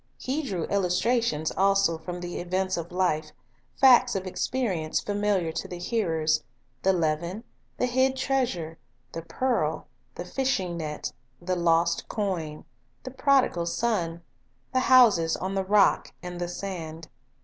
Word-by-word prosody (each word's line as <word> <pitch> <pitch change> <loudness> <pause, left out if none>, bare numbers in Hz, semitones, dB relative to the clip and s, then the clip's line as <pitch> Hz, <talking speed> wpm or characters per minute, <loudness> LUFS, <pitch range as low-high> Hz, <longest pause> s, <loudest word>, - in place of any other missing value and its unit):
He 275 +4 -2
drew 195 - -3
illustrations 200 -3 +1
also 195 -4 +3
from 180 +2 -6
the 175 0 -5
events 185 +2 -1
of 170 +1 -5
life, 160 -4 0 0.5
facts 255 -2 +6
of 190 -1 -2
experience 185 -5 -1
familiar 205 -5 0
to - - -4
the 180 - -7
hearers, 160 -6 0 0.2
— 125 +1 -42
the 190 - +3
leaven, 170 +4 -1 0.3
the - - +1
hid 260 +2 +2
treasure, 240 - -1 0.3
the 165 - -5
pearl, 165 -5 -1 0.3
the 175 - -6
fishing 195 -6 -1
net, 155 -2 -4 0.3
the 185 +1 -2
lost 170 -1 +2
coin, 170 -8 -3 0.4
the 255 - -7
prodigal 260 -10 +2
son, 170 -5 -1 0.5
the 255 - +3
houses 220 -11 +5
on 190 +1 -3
the 195 0 0
rock 200 +1 +3
and 180 0 -6
the 175 - -1
sand. 165 -4 -6
185 Hz, 140 wpm, -26 LUFS, 165-225 Hz, 0.5 s, facts